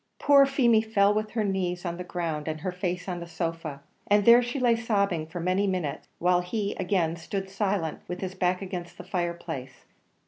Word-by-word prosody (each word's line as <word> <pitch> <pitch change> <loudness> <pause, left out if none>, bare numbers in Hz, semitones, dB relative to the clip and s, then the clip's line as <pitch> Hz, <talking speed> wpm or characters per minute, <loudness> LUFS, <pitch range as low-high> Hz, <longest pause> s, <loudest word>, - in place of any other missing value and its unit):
Poor 280 -1 +6
Feemy 240 -5 +4
fell 210 -2 +3
with 215 0 -1
her 225 -2 +1
knees 185 -3 -1
on 170 -1 -3
the 180 - -5
ground 165 -4 -3
and 155 -1 -3
her 185 - -2
face 180 0 -3
on 180 -2 -3
the 170 - -7
sofa, 165 -4 -4 0.2
and 205 0 +4
there 235 +1 +8
she 240 +3 -3
lay 240 -2 +4
sobbing 200 -8 0
for 165 +2 -6
many 185 +4 +1
minutes, 180 -7 -2
while 180 +1 +3
he 200 +3 -2
again 180 -3 +1
stood 190 +3 -5
silent 195 -5 -1
with 180 0 -5
his 190 -1 -4
back 185 0 0
against 180 -2 -6
the - - -8
fireplace. 170 -7 -4
180 Hz, 200 wpm, -27 LUFS, 170-205 Hz, 0.2 s, there